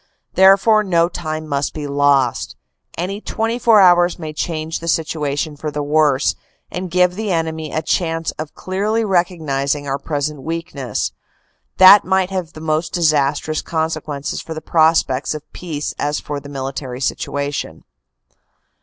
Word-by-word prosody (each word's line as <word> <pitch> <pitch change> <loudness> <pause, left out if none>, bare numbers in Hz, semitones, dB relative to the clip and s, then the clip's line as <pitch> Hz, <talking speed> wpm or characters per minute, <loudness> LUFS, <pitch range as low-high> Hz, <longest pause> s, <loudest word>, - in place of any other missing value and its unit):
" - - -51
Therefore 195 +3 +5
no 170 -4 +2
time 155 -3 -5
must 140 -1 -2
be 150 -2 -4
lost. 140 -3 +1 0.4
Any 195 +4 -3
twenty 225 +2 -2
four 230 -3 +5
hours 175 -2 +5
may 155 -3 -6
change 160 0 -3
the 170 - -8
situation 155 -2 -1
for 150 +1 -4
the 150 0 -3
worse, 145 -2 +2 0.4
and 180 0 -4
give 180 +1 +3
the 210 +1 -3
enemy 160 -2 -2
a 155 - -2
chance 165 0 -1
of 155 -1 -6
clearly 210 +4 -1
recognizing 150 -7 0
our 135 +1 -2
present 150 -1 -3
weakness. 160 -4 -3 0.7
That 190 +2 +9
might 190 0 +1
have 180 -4 -4
the 155 - -10
most 155 0 -1
disastrous 155 -2 +1
consequences 155 -3 -3
for 160 - -7
the - - -4
prospects 155 -4 +2
of 150 - -10
peace 155 -5 -4
as 145 +1 -1
for 145 -1 -5
the 140 - -11
military 135 -2 -5
situation. 140 +1 -3
155 Hz, 150 wpm, -19 LUFS, 145-180 Hz, 0.7 s, That